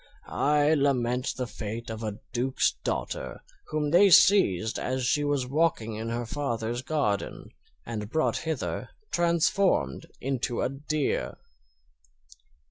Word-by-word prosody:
I 150 +1 +2
lament 130 -3 +1
the 130 - -1
fate 115 0 -6
of 110 0 -6
a 105 -2 -4 0.2
duke's 130 +2 +1
daughter, - - -3 0.2
whom 150 -1 -1
they 195 +4 +7
seized 135 - +5
as 130 0 -2
she 145 +4 +2
was 145 -3 0
walking 135 -5 0
in 110 +2 -4
her 120 +1 -2
father's 120 -2 -2
garden, 130 -8 -2 0.3
and 105 -3 -5
brought 160 +5 +1
hither 160 -4 -3 0.2
transformed 170 - +1
into 130 -2 -1
a - - +1
deer." 140 - -2
130 Hz, 125 wpm, -27 LUFS, 115-150 Hz, 0.3 s, they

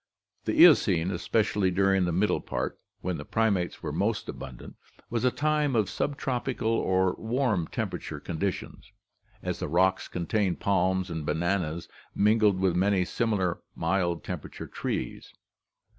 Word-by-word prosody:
The - - 0
Eocene, 85 +3 +4
especially 100 +1 +1
during 95 0 +3
the 85 - 0
middle 95 +5 +1
part, - - -3 0.2
when 90 -2 -2
the 75 - -6
primates 100 -2 0
were - - -2
most - - -1
abundant, 65 -3 -8 0.4
was 115 0 -1
a 130 - +5
time 150 0 +1
of 105 -4 +1
subtropical 130 -4 -1
or 95 -4 +2
warm 110 - 0
temperate - - -4
conditions, 90 +3 -4 0.5
as - - -3
the - - -2
rocks 95 +4 +2
contain 90 +2 0
palms 95 -1 +1
and 80 -2 -3
bananas 85 0 -1 0.3
mingled 105 -2 +4
with 95 -2 +2
many 95 0 +2
similar 100 -5 0
mild 85 0 0
temperate - - -7
trees. - - -4
95 Hz, 135 wpm, -28 LUFS, 90-110 Hz, 0.5 s, a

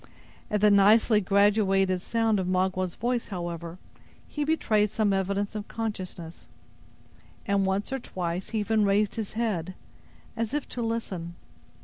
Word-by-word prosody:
At 210 -1 0
the 210 0 +6
nicely 210 +2 +5
graduated 195 -2 +3
sound 225 0 +1
of 185 - -2
Magua's 185 -1 0
voice, 240 +1 -1
however, 170 -2 -5 0.5
he 295 - -3
betrayed 220 -9 +2
some 215 -2 +1
evidence 200 +2 -1
of 210 -1 -5
consciousness, 185 -7 -6 1.0
and 200 -1 +1
once 200 +7 -1
or 270 - -1
twice 180 -4 -4
he 220 -2 -1
even 215 +1 +1
raised 200 +1 +2
his 220 -3 -5
head, 190 -6 -2 0.6
as 230 +4 -2
if 295 - -2
to 245 - -4
listen. 195 -7 -3
200 Hz, 140 wpm, -27 LUFS, 185-220 Hz, 1.0 s, the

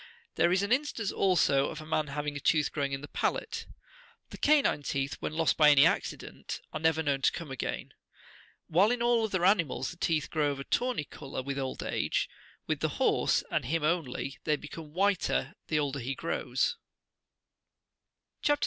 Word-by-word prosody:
There 170 - +3
is 185 +2 +2
an 200 - -2
instance, 255 -6 0
also, 155 -7 +3
of 160 - -7
a 155 - -9
man 155 -1 0
having 145 +1 -3
a - - -3
tooth 150 0 +2
growing 140 -2 -1
in 135 0 -3
the 145 - -8
palate.39 475 - -5
The - - -8
canine 290 - +3
teeth,40 140 0 -2
when - - -4
lost 160 -1 +2
by 150 -1 +7
any 145 -2 +7
accident, - - -2
are - - -2
never 160 0 +2
known 140 -2 0
to - - +4
come 165 -5 -7
again. 135 - -4 0.7
"While 185 +6 +4
in 245 0 0
all 240 -1 +3
other 185 -5 0
animals 170 -9 +2
the 175 - -12
teeth 160 -3 0
grow 150 -2 +1
of 140 -1 -3
a - - -4
tawny 250 - 0
colour 140 -2 -7
with 140 +1 -3
old 130 -1 -3
age, - - 0 0.4
with - - -1
the - - -2
horse, - - +2
and - - 0
him 160 +5 -1
only, 150 -4 -1
they 150 - +2
become 150 +1 -9
whiter 185 -5 +1
the 155 - 0
older 140 -2 -1
he 135 +2 -3
grows. - - -1 1.6
CHAP. 290 - +3
64. - - -17
155 Hz, 190 wpm, -30 LUFS, 140-190 Hz, 1.6 s, by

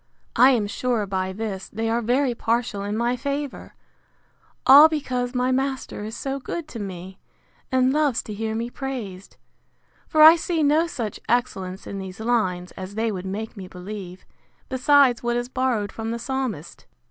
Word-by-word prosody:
I 250 +3 +7
am 235 -6 +2
sure, 225 +1 -1
by 190 -1 -2
this, 195 -1 -5
they 225 +2 -3
are 230 +1 +1
very 250 +3 +1
partial 230 -3 -1
in 205 +2 -3
my 240 +2 +1
favour; 280 +2 -5 0.9
all 290 +4 +10
because 255 -5 -2
my 250 +1 +1
master 265 -4 -2
is 220 +2 -6
so 275 0 -3
good 310 +4 -5
to 230 - -7
me, 190 -1 -7 0.5
and 260 0 +3
loves 295 -5 +1
to 215 - -7
hear 220 +1 -3
me 235 +2 -3
praised; 230 -10 -6 0.7
for 310 -1 +5
I 320 +2 +10
see 330 -1 -1
no 305 +4 +3
such 240 -11 -5
excellence 195 -6 -1
in 200 - -6
these 190 0 -8
lines, 215 -6 0
as 190 +1 -8
they 225 +1 0
would 190 -2 -5
make 215 +4 -5
me 190 -3 -8
believe, 185 0 -8 0.4
besides 265 -1 +4
what 240 0 0
is 240 +1 -3
borrowed 245 -6 -1
from 225 0 -5
the 230 - -2
Psalmist. 240 - -4
235 Hz, 170 wpm, -23 LUFS, 205-260 Hz, 0.9 s, all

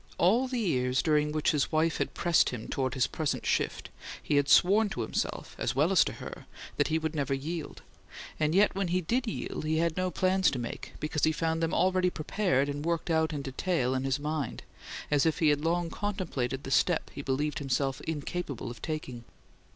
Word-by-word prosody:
All 230 +9 +3
the 255 -1 -3
years 130 - +1
during 150 -1 +2
which 155 0 +1
his 150 -3 0
wife 160 +1 +2
had - - -2
pressed 170 -2 +3
him 120 -3 -6
toward 130 -1 -2
his 130 -3 +3
present 155 -2 -2
shift - - -1 0.3
he 145 - +1
had 145 0 +2
sworn 205 +4 +5
to - - -4
himself, - - -3
as - - -1
well - - +3
as - - +6
to - - -3
her, - - -9 0.3
that - - +2
he 160 - +1
would 160 0 -2
never 140 -3 0
yield; 155 +3 -5 0.6
and 155 +2 +1
yet 205 +2 +5
when 195 -1 -1
he 180 +2 +1
did 240 +9 -1
yield 215 - -4
he 155 +1 0
had 165 0 +1
no 185 0 0
plans 185 +1 +2
to 135 - -3
make, 120 -1 -6
because 150 -1 -3
he 160 - +5
found 160 +1 -1
them 165 0 0
already 185 0 +3
prepared 155 -4 0
and 145 0 -4
worked 170 +1 -1
out 160 0 +2
in 145 -2 -4
detail 135 -1 -1
in 130 0 -1
his 135 0 0
mind; 150 -3 -3 0.5
as 145 -2 +4
if 160 -1 +2
he 160 -4 +3
had 145 0 +2
long 170 0 0
contemplated 155 -11 -3
the 135 - -6
"step" 175 +4 +2
he - - -5
believed 145 +2 -1
himself 135 -1 -1
incapable 150 -5 -4
of 120 - -11
taking. 135 -7 -5
155 Hz, 210 wpm, -29 LUFS, 140-175 Hz, 0.6 s, as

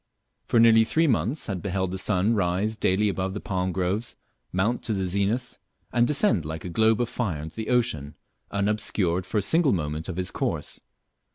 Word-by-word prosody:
For 120 - +2
nearly 115 -1 +7
three 160 +8 +1
months 120 - 0
had 95 -4 -3
beheld 95 -2 -2
the 95 - 0
sun 100 +3 +2
rise 100 +2 +1
daily 105 0 +1
above 95 -1 -2
the - - -3
palm 95 -2 -2
groves, 95 +6 -1 0.4
mount 105 +7 0
to 110 - +1
the 95 -2 -1
zenith, 100 +7 -1 0.3
and 120 0 +3
descend 150 - +2
like 80 +3 -6
a - - -4
globe 110 +5 +3
of 120 - 0
fire 100 -11 -3
into 80 +5 -9
the 110 -1 -4
ocean, 110 - 0 0.3
unobscured 100 -3 0
for 110 - -2
a 105 - +2
single 160 - +3
moment 75 -1 -3
of 90 - -5
his 90 -1 -1
course. - - -2
100 Hz, 190 wpm, -25 LUFS, 90-115 Hz, 0.4 s, nearly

